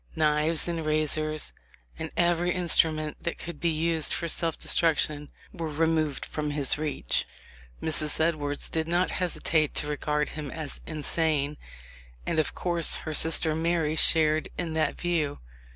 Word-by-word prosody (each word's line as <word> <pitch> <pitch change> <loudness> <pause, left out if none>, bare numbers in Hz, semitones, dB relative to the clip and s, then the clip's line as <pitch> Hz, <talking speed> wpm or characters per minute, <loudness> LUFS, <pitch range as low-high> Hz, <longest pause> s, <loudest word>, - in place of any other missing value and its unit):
"Knives 155 +1 +1
and 165 -2 -3
razors, 155 0 0 0.5
and - - -4
every 175 0 +2
instrument 160 -4 +2
that 170 - -4
could 170 -3 -8
be 170 - +1
used 160 0 +1
for 170 - -2
self 165 0 0
destruction 150 -3 +1 0.2
were 165 -3 -4
removed 155 -1 0
from 150 -1 -4
his 145 -2 +2
reach.''* 150 - -2 0.6
Mrs. 155 -1 +1
Edwards 150 -3 -1
did 160 -1 -2
not 175 +2 +1
hesitate 160 -4 0
to - - +2
regard 150 0 -1
him 150 -2 -7
as 155 0 -5
insane, 155 -1 -1 0.7
and 160 - 0
of 155 - -1
course 170 -2 +3
her 155 - -3
sister 160 0 +5
Alary 160 -1 0
shared 155 -1 +3
in 170 -3 -3
that 155 -2 -1
view. 165 -5 -1
155 Hz, 145 wpm, -27 LUFS, 150-165 Hz, 0.7 s, sister